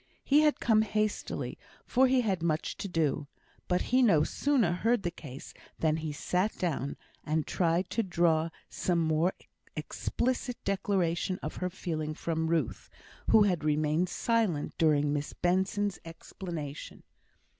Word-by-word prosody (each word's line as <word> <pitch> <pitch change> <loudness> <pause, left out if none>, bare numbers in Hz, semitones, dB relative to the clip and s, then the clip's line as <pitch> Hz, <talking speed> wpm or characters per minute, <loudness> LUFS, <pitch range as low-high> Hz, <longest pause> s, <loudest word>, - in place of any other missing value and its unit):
He 290 +2 +5
had 300 -1 +3
come 220 -2 +4
hastily, 215 0 -2 0.3
for 260 +1 +4
he 255 0 +3
had 195 -7 0
much 160 -1 -1
to - - -4
do; 155 -5 0 0.4
but 180 - +1
he 255 - +6
no 195 -11 +5
sooner 260 - +1
heard 225 +5 +1
the 175 - -1
case 140 -6 -10 0.2
than 160 -1 +1
he 160 -1 -3
sat 180 +7 -1
down, 145 -6 -2 0.3
and 155 0 0
tried 175 +1 0
to 230 - +1
draw 170 -4 +2 0.2
some 175 -2 -1
more 160 +2 +2 0.4
explicit 250 0 -2
declaration 185 -2 0
of - - -5
her 180 - -1
feeling 155 -4 -4
from 160 0 -1
Ruth, 160 -7 -1 0.4
who 215 - +7
had 180 -6 +1
remained 155 +3 +1
silent 220 -11 0
during 150 -2 +3
Miss 145 0 -3
Benson's 190 +3 0
explanation. 165 -3 -7
175 Hz, 145 wpm, -30 LUFS, 155-205 Hz, 0.4 s, who